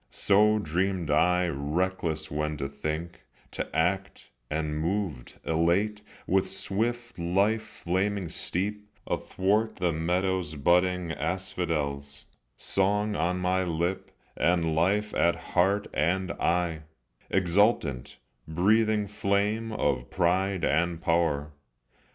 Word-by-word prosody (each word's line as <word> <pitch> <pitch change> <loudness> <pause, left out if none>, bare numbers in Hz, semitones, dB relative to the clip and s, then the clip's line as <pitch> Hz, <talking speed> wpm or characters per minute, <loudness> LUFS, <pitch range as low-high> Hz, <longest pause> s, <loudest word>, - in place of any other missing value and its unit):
So 105 +2 +4
dreamed 90 -2 -1
I 90 +4 +3
reckless 80 +1 -2
when 75 0 -2
to 70 0 -3
think, 75 +5 -5 0.3
to - - -4
act, 95 +4 -1 0.2
And 75 0 -2
moved, 85 -6 -3
elate, 90 +6 +1 0.2
with 95 +1 +1
swift 115 +4 -1
life 100 +6 +2 0.2
flaming 95 +2 0
step 95 +5 -1 0.3
Athwart 105 +4 0
the 90 -2 0
meadow's 90 0 -1
budding 90 +3 +2
asphodels, 75 -7 -3 0.3
Song 105 +2 +1
on 90 +1 0
my 90 +1 +1
lip, 85 +2 -2 0.3
and 85 -2 +2
life 100 +6 +1
at 85 - +3 0.2
heart 95 +3 +3
and 90 +3 0
eye, 85 -2 0 0.5
Exultant, 90 - +1 0.3
breathing 105 +6 +2
flame 105 +2 0
of 70 - -1
pride 95 +1 +1
and 85 +2 +1
power. 80 -3 +1
90 Hz, 105 wpm, -28 LUFS, 80-100 Hz, 0.5 s, So